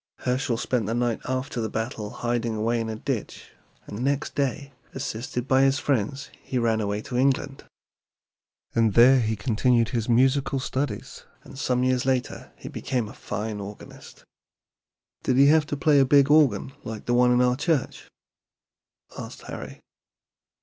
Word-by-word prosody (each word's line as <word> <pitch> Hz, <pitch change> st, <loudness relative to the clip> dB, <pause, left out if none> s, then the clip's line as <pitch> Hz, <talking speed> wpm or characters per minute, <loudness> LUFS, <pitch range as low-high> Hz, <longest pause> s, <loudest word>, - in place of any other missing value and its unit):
Herschel 125 Hz, -1 st, 0 dB
spent 115 Hz, -2 st, -1 dB
the 115 Hz, -, -1 dB
night 120 Hz, -2 st, 0 dB
after 130 Hz, 0 st, -2 dB
the 110 Hz, -, -2 dB
battle 110 Hz, -1 st, -4 dB
hiding 120 Hz, 0 st, -2 dB
away 115 Hz, +2 st, 0 dB
in 110 Hz, -, -4 dB
a 110 Hz, -, -3 dB
ditch, 110 Hz, -, -5 dB, 0.3 s
and 105 Hz, +4 st, -6 dB
next 140 Hz, +2 st, -1 dB
day, 140 Hz, 0 st, -2 dB, 0.2 s
assisted 125 Hz, -1 st, -4 dB
by 130 Hz, 0 st, +4 dB
his 135 Hz, 0 st, +3 dB
friends, 135 Hz, 0 st, -2 dB
he 130 Hz, -, -4 dB
ran 115 Hz, -2 st, +1 dB
away 105 Hz, 0 st, -2 dB
to 135 Hz, -3 st, -7 dB
England. 135 Hz, +1 st, 0 dB, 1.1 s
There 115 Hz, +4 st, +5 dB
he 110 Hz, -2 st, 0 dB
continued 115 Hz, +2 st, +1 dB
his 115 Hz, -1 st, -2 dB
musical 135 Hz, +3 st, +2 dB
studies, 130 Hz, +2 st, -4 dB, 0.2 s
and -, -, -13 dB
some 125 Hz, -2 st, 0 dB
years 130 Hz, -1 st, +1 dB
later 130 Hz, -2 st, -2 dB
he -, -, -11 dB
became 125 Hz, -4 st, -3 dB
a -, -, -10 dB
fine 105 Hz, +1 st, -5 dB
organist." 100 Hz, +1 st, -11 dB, 1.0 s
"Did 130 Hz, -, +1 dB
he 140 Hz, -, +7 dB
have 155 Hz, -1 st, +4 dB
to 145 Hz, -, -3 dB
play 145 Hz, 0 st, +4 dB
a -, -, +6 dB
big 140 Hz, +1 st, +4 dB
organ 135 Hz, -5 st, +3 dB
like 110 Hz, -1 st, -7 dB
the 120 Hz, -, 0 dB
one 125 Hz, 0 st, +4 dB
in 125 Hz, -, +3 dB
our 125 Hz, 0 st, +3 dB
church?" 145 Hz, 0 st, -2 dB, 1.1 s
asked -, -, -9 dB
Harry. -, -, -8 dB
125 Hz, 160 wpm, -25 LUFS, 115-135 Hz, 1.1 s, he